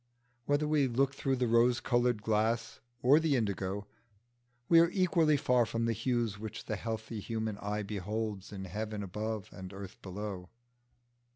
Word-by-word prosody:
Whether 145 +1 +2
we 150 -3 +3
look 135 +3 +1
through 135 -1 0
the 125 -1 0
rose 120 +1 +4
coloured 120 -3 +1
glass 115 +2 0 0.2
or 140 +5 +7
the 160 -3 +2
indigo, 100 -3 -1 0.8
we 165 - +7
are 170 0 +5
equally 170 -5 +3
far 125 -2 +3
from 115 +1 -1
the 115 - +1
hues 115 -2 -1
which 110 0 -6
the - - -2
healthy 110 -1 -4
human 110 -1 -3
eye 105 +1 -2
beholds 105 0 -3
in 95 -2 -6
heaven 105 +2 -4
above 105 +1 -4
and 95 -1 -8
earth 100 -1 -9
below. 95 -1 -6
110 Hz, 160 wpm, -32 LUFS, 105-125 Hz, 0.8 s, or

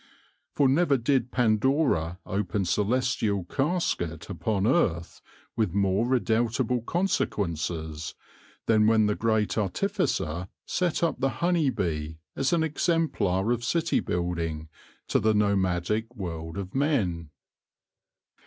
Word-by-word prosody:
For 140 - +4
never 140 +1 +3
did 125 0 +1
Pandora 110 - +2
open 95 0 -1
celestial 105 0 0
casket 100 - -2
upon 100 +2 -1
earth 95 - +1 0.3
with 105 -6 0
more 100 +3 +2
redoubtable 120 0 +1
consequences, 85 - -2 0.5
than 110 -1 +4
when 110 -1 +4
the 105 - +2
Great 110 0 0
Artificer 100 - -1 0.2
set 175 -2 0
up 165 -4 0
the 135 - +2 0.2
honey 170 -5 +3
bee 80 -8 -3 0.2
as 135 - 0
an 170 -2 +2
exemplar 150 - +1
of 120 -1 -1
city 165 +6 +1
building 85 -3 -2 0.4
to - - +2
the 110 0 +2
nomadic 100 +2 0
world 80 -4 -5
of 95 -1 -5
men. 100 - 0
110 Hz, 115 wpm, -27 LUFS, 90-130 Hz, 0.5 s, For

